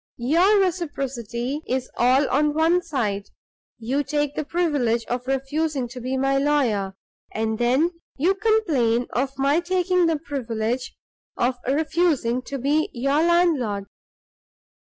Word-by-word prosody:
Your 345 - +3
reciprocity 275 - -2
is 255 0 -1
all 260 +3 +3
on 295 +2 +1
one 330 +3 +3
side. 220 - -2 0.5
You 250 +5 -1
take 290 +1 -1
the 310 - -2
privilege 285 -9 0
of 245 +1 -4
refusing 270 0 -1
to 250 +1 -8
be 260 +2 -2
my 270 +1 +2
lawyer, 240 -10 +1 0.4
and 220 0 -2
then 260 +8 +2 0.3
you 340 +8 +3
complain 330 - +1
of 270 +2 -1
my 280 +4 +2
taking 360 0 +1
the 325 -1 +1
privilege 250 -4 -3 0.4
of 245 +1 +1
refusing 295 -4 +1
to 280 - -4
be 290 +4 +1
your 275 +5 +1
landlord." 320 - +2
275 Hz, 130 wpm, -23 LUFS, 245-320 Hz, 0.5 s, Your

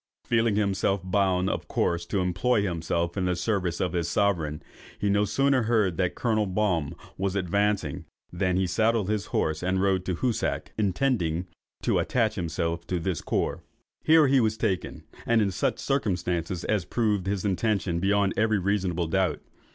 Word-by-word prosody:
Feeling 115 -2 +2
himself 100 -2 +1
bound 95 -1 +1
of - - -3
course 85 0 -1
to 95 +1 0
employ 100 +5 +1
himself 85 -1 -1
in 95 -2 -1
the 90 -1 +1
service 90 -1 -1
of 90 -2 -1
his 85 -2 0
sovereign, 85 -8 0 0.3
he 100 0 0
no 100 +1 +3
sooner 135 +3 +2
heard 110 -6 +1
that 90 -2 0
Colonel 110 -3 0
Baum 90 -6 0 0.2
was 95 0 -1
advancing, 100 -3 0 0.3
than 90 0 0
he 95 - +2
saddled 110 +3 +1
his 105 -2 -2
horse 80 0 -1
and 90 +1 0
rode 95 -1 +1
to 90 - -1
Hoosac, 120 +4 -1
intending 95 -5 0 0.4
to - - +2
attach 110 -3 +1
himself 85 -2 -3
to 90 -1 -1
this 85 -1 -2
corps. - - -1 0.4
Here 160 -1 +6
he 135 0 +4
was 110 -2 +1
taken, 100 -5 -2 0.2
in 110 -4 +3
such 90 - -1
circumstances 90 - -1
as 105 -4 0
proved 105 -1 0
his 100 0 -1
intention 100 -3 0
beyond 100 +1 +2
every 110 -1 +2
reasonable 95 -3 0
doubt. 95 +3 0
95 Hz, 165 wpm, -26 LUFS, 90-105 Hz, 0.4 s, Here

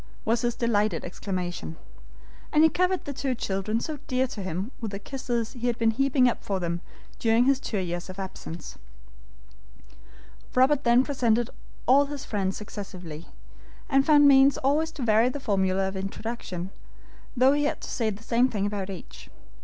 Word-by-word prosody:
was 230 +1 +2
his 240 -1 0
delighted 215 -3 +1
exclamation. 175 - -4 0.7
And 305 - +5
he 320 - +6
covered 365 0 +1
the 285 - -4
two 265 -1 -1
children 205 +1 -1
so 300 +4 -4
dear 255 0 +1
to 210 - -6
him 185 +5 -3
with 225 - -2
the 200 - -5
kisses 240 0 -3
he 245 -1 -3
had 240 -1 0
been 225 -1 +3
heaping 265 +1 +3
up 240 - -1
for 195 -2 -1
them 170 -1 -2 0.4
during 230 +1 +3
his 270 0 +3
two 220 - -3
years 175 -1 -3
of 185 - -8
absence. 185 -3 -7 1.8
Robert 265 +2 +4
then 240 +2 +5
presented 240 -5 +1 0.3
all 275 +3 +6
his 285 -1 -6
friends 195 -3 -1
successively, 185 -6 -8 0.6
and 275 -1 +4
found 290 -1 +6
means 275 0 +6
always 295 +4 +1
to 280 - -5
vary 225 +1 +4
the 290 - -5
formula 190 -5 +1
of 190 - -5
introduction, 190 -2 -5 0.7
though 260 +3 +6
he 290 0 +1
had 295 - -1
to - - -6
say 230 -3 -1
the 210 +1 -7
same 240 +3 +3
thing 205 -4 -1
about 200 -2 -3
each. 65 - -9
230 Hz, 175 wpm, -26 LUFS, 195-265 Hz, 1.8 s, he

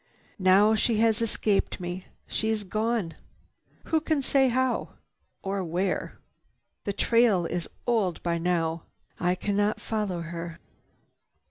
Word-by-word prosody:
Now 195 +3 +5
she 220 +1 +2
has 225 0 +3
escaped 215 -3 +1
me. 180 +1 -5 0.2
She 220 - -2
is 220 -1 0
gone. 215 -3 -1 0.7
Who 320 -1 +1
can 310 -3 0
say 270 0 +4
how 255 +1 0 0.5
or 195 0 -1
where? 180 +3 -2 0.7
The 200 - 0
trail 230 -5 +3
is 170 0 -2 0.2
old 215 -8 +1
by 170 -1 0
now. 165 -1 0 0.4
I 180 0 +2
cannot 205 +2 0
follow 210 -6 -2
her." 165 0 -6
200 Hz, 125 wpm, -27 LUFS, 175-225 Hz, 0.7 s, Now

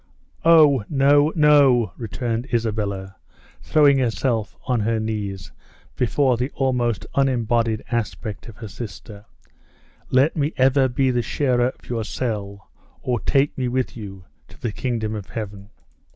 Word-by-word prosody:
"O, 155 -7 +6
no, 145 +2 +4
no," 145 -7 +4
returned 115 +3 -3
Isabella, 100 -5 -2 0.4
throwing 145 -3 +4
herself 115 -2 -1
on 125 -3 +1
her 110 +1 0
knees 105 -4 -4 0.4
before 125 0 +1
the 125 +3 -2
almost 125 -5 0
unembodied 120 -4 +1
aspect 110 -2 -3
of 110 - -11
her 110 +1 -8
sister; 105 -1 -9 0.8
"let 135 +5 +3
me 150 0 -1
ever 130 +1 +4
be 130 +1 +1
the 120 -1 +1
sharer 125 -1 +1
of 130 - -9
your 115 -2 -2
cell, 100 -4 -5 0.3
or 125 -2 0
take 140 +4 +1
me 130 -2 -2
with 130 +1 -2
you 100 -5 -9 0.2
to - - -18
the 115 - -3
kingdom 110 -2 -3
of 105 -3 -6
Heaven!" 100 -3 -7
120 Hz, 135 wpm, -22 LUFS, 110-135 Hz, 0.8 s, O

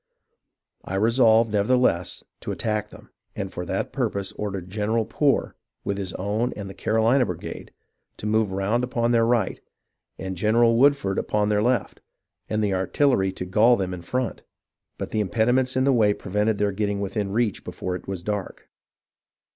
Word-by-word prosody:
I 95 - -5
resolved, 115 +1 +4
nevertheless, 105 -4 +1 0.2
to - - -5
attack 105 -1 -2
them, - - -15
— - - -48
and - - -4
for - - -4
that - - -2
purpose 100 -1 -2
ordered 100 -4 -5
General 110 +3 0
Poor, 140 +4 +1 0.3
with 100 0 -2
his 95 -2 -4
own 105 +6 -1
and 100 -2 -7
the 95 - -8
Carohna 115 +6 +2
brigade, 90 -8 -6 0.5
to - - -7
move 110 -1 +1
round 100 +6 0
upon 120 -1 0
their 115 -1 +3
right, 115 -5 +1 0.6
and 95 0 -5
General 115 +5 +3
Woodford 135 -6 +3
upon 105 0 0
their 105 0 +2
left, 120 -2 0 0.5
and 110 0 0
the 100 -2 +1
artillery 95 +2 +2
to 90 - -5
gall 110 +7 +5
them 95 -4 -2
in 90 - -6
front; 125 +7 -3 0.6
but - - -5
the 110 - 0
impediments 120 +6 +1
in 130 - +2
the 135 0 +4
way 105 -4 +3
prevented 105 +2 0
their 105 0 +1
getting 100 0 -1
within 100 0 -2
reach 110 -1 0
before 90 -1 -4
it 90 - -9
was 95 -3 -4
dark. 105 -1 -5
105 Hz, 170 wpm, -24 LUFS, 95-115 Hz, 0.6 s, gall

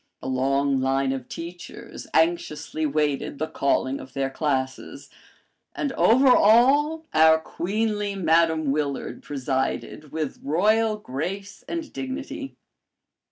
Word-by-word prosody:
A - - -7
long 135 +1 +1
line 135 0 +1
of 130 -2 -5
teachers 170 +1 -9
anxiously 160 -2 0
waited 145 -1 -1
the 155 - -1
calling 135 -2 0
of 130 - -11
their 135 -1 -1
classes, 135 -3 -3 0.6
and 285 - -2
over 255 +3 +4
all, 275 +9 +4
our 160 0 +6
queenly 205 +5 -2
Madame 160 -4 +2
Willard 140 -1 -3
presided 135 +2 -3
with 155 -3 -4
royal 215 +9 +2
grace 195 +5 -5
and 330 -3 -5
dignity. 270 +1 -6
160 Hz, 115 wpm, -24 LUFS, 140-210 Hz, 0.6 s, our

